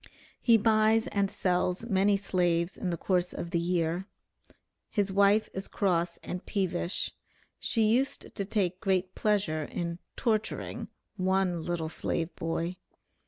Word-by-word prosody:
He 230 -2 +6
buys 220 +1 +4
and 200 -1 0
sells 180 +2 0
many 200 -2 +3
slaves 175 -3 +1
in 185 - -3
the 170 - -1
course 180 +1 0
of 170 - -5
the 170 - +2
year. 170 +1 0 0.8
'His 200 -3 0
wife 200 +2 +4
is 190 +1 -5
cross 175 -4 0
and 180 - -5
peevish.' 185 -2 -1 0.5
She 225 - +1
used 240 +6 +1
to 200 - -2
take 190 -3 -1
great 185 -1 +1
pleasure 195 -7 +1
in 170 +2 -4 0.2
'torturing' 220 -3 -1 0.3
one 185 -2 +1
'little 165 -1 -2
slave 165 +1 -2
boy.' 165 +2 -2
185 Hz, 135 wpm, -29 LUFS, 175-205 Hz, 0.8 s, He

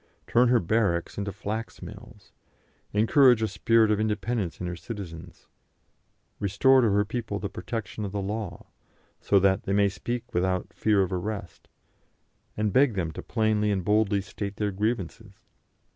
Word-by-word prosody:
Turn 125 +1 +4
her 120 0 +4
barracks 100 -3 0
into 100 0 -3
flax 105 +4 -5
mills, - - -12 0.6
encourage 115 +2 +5
a - - +2
spirit 110 +2 +3
of 105 - +1
independence 105 -3 -2
in 90 - -4
her 90 0 -3
citizens, 85 -4 -9 0.9
restore 115 +7 +4
to 115 - +3
her 105 +1 +2
people 110 -1 -4
the 100 -1 -4
protection 110 -2 -5
of 100 - -4
the 100 - -3
law, 100 -1 -4 0.5
so 100 - +3
that 95 +1 +3
they 100 - -1
may 100 0 +4
speak 120 +4 -5
without 90 +1 -1
fear 105 -3 +2
of 95 - -3
arrest, 100 +1 -5 0.9
and 105 -2 0
beg 130 -4 +4
them 85 -4 -1
to - - -7
plainly 110 -2 +1
and 95 -3 -1
boldly 105 -1 +2
state 100 0 -6
their 105 -1 -1
grievances. 105 0 -3
105 Hz, 160 wpm, -27 LUFS, 95-110 Hz, 0.9 s, encourage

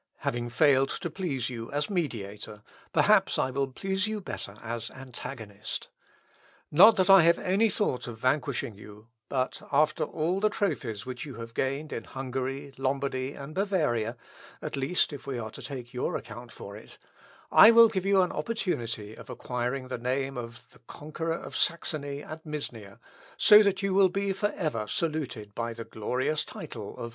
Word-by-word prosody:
Having 120 0 -2
failed 135 +2 +4
to 170 - -4
please 140 -9 -2
you 115 -2 -6
as 145 +5 0
mediator, 105 - -4 0.3
perhaps - - +4
I 130 - +1
will 135 +1 0
please 190 +8 -1
you 215 0 -2
better 105 - -6
as 115 0 -4
antagonist. 120 -5 -7 0.8
Not 205 +9 +8
that 185 -1 +2
I 195 -1 +9
have 170 +1 +5
any 200 +5 +2
thought 185 -12 -1
of 115 -2 -6
vanquishing 130 0 0
you, 105 +2 -14 0.2
but 130 -1 -1
after 155 +2 +3
all 170 +4 -1
the 215 +1 +3
trophies 125 - -2
which 125 +1 -5
you 145 -4 -8
have 115 0 -8
gained 140 +5 -2
in 115 - -5
Hungary, 135 +1 -4
Lombardy, 135 0 -1
and 140 +1 -8
Bavaria, 150 - 0 0.4
(at - - -4
least 140 +4 +1
if 145 - -9
we 135 -2 -2
are 110 -2 -5
to - - -10
take 125 -4 -7
your 125 - -1
account 120 +2 -7
for 100 - -9
it,) 110 - -13 0.5
I 220 - +10
will 230 0 +9
give 195 -4 -2
you 195 -1 +4
an 180 - -1
opportunity 115 - -3
of - - -12
acquiring 125 +1 -3
the 125 - -3
name 135 +2 -1
of 115 -1 -7
the - - -20
conqueror 160 +5 -4
of - - -9
Saxony 145 -4 -1
and 155 +1 -8
Misnia, 120 -10 -6 0.4
so 210 0 +9
that 200 -1 +1
you 195 -1 +1
will 190 -1 +6
be 200 +1 -1
for 205 +2 0
ever 115 -11 -2
saluted 135 -9 -3
by 115 +1 -3
the 115 0 -7
glorious 130 +7 -1
title - - -8
of - - -17
Augustus." 115 - -5
135 Hz, 175 wpm, -28 LUFS, 120-170 Hz, 0.8 s, I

